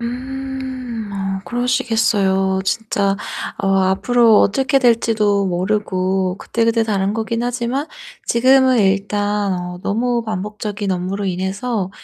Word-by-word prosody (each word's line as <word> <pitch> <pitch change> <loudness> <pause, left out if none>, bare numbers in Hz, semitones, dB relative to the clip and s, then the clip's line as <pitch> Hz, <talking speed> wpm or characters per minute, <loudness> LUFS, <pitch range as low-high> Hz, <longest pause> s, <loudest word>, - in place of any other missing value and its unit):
음. 255 -2 -5
어 195 -1 -3
그러시겠어요. 220 -6 +1
진짜 200 -2 0 0.4
어 195 -1 -1
앞으로 215 +4 +4
어떻게 270 +7 +2
될지도 215 -4 +2
모르고 185 0 0
그때그때 230 0 +1
다른 200 -2 0
거기는 230 +2 -2
하지만 245 +4 -2 0.4
지금은 260 +1 +4
일단 205 +1 +1
어 180 0 -4
너무 235 +3 0
반복적인 210 0 -4
업무로 185 +2 -2
인해서 190 +3 -2
210 Hz, 265 characters per minute, -19 LUFS, 195-240 Hz, 0.4 s, 앞으로